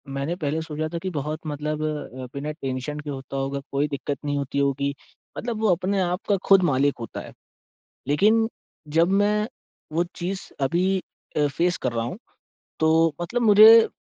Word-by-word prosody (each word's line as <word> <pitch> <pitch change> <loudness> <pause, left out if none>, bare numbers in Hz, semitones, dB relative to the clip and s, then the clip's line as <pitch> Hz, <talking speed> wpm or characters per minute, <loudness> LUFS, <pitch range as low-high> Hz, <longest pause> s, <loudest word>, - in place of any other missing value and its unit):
मैंने 140 +5 -2
पहले 155 -2 -2
सोचा 155 0 -3
था - - -1
कि 185 - -3
बहुत 150 +2 -3
मतलब 150 +1 -3
अ, 150 -4 -4
बिना 145 +2 -4
टेंशन 135 0 -4
के 150 0 -7
होता 135 -1 -6
होगा, 135 +1 -2
कोई 140 +2 +1
दिक़्क़त 140 0 -3
नहीं 145 0 0
होती 140 0 -2
होगी 140 0 0 0.4
मतलब 230 -2 -3
वो 220 - +3
अपने 190 +3 -1
आप 180 +1 -1
का 200 - +4
ख़ुद 195 -1 +7
मालिक 140 +2 +2
होता 115 - -6
है। - - -11 0.8
लेक़िन 215 +10 +4 0.5
जब 165 +1 +5
मैं 210 +1 +1 0.4
वो 170 +2 +2
चीज़ 185 +2 -4 0.2
अभी 170 +7 +1 0.5
अ, 150 - +3
फ़ेस 170 +5 0
कर 125 - -2
रहा 115 -1 -1
हूँ, 125 - -5 0.6
तो 160 0 +4
मतलब 235 +8 -1
मुझे 220 +1 +8
155 Hz, 175 wpm, -24 LUFS, 140-185 Hz, 0.8 s, मुझे